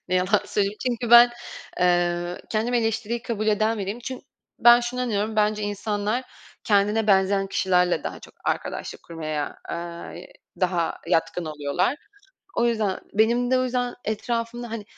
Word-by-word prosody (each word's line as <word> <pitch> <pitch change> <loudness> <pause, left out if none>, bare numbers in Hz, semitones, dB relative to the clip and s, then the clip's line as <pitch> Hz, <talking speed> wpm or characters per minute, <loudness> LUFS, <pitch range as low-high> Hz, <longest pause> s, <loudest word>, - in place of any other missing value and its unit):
Ne 185 - 0
yalan 185 +3 +3
söyleyeyim 200 0 0
çünkü 240 -1 -1
ben, 240 0 +9 0.5
eee, 175 0 +1
kendimi 230 +3 0
eleştiriyi 230 +1 -1
kabul 215 -2 -3
eden 215 +1 +2
biriyim 200 +3 -3
çün 255 +1 -6 0.4
ben 240 0 +7
şunu 245 +1 -3
inanıyorum. 220 -2 -1
Bence 210 0 +2
insanlar 205 +3 -2 0.4
kendine 210 +1 +2
benzeyen 195 -1 +3
kişilerle 180 -3 +2
daha - - -5
çok - - -15
arkadaşlık - - -3
kurmaya, 155 -3 -4
ııı, 170 0 -6 0.5
daha 175 -2 0
yatkın 165 +2 0
oluyorlar. 155 - -1 0.6
O 235 - +3
yüzden, 215 -5 0
benim 235 +4 +2
de 260 - +4
o 255 - +1
yüzden 245 -1 -1
etrafımda 230 +2 -3
hani 225 -2 -5
210 Hz, 145 wpm, -24 LUFS, 185-235 Hz, 0.6 s, ben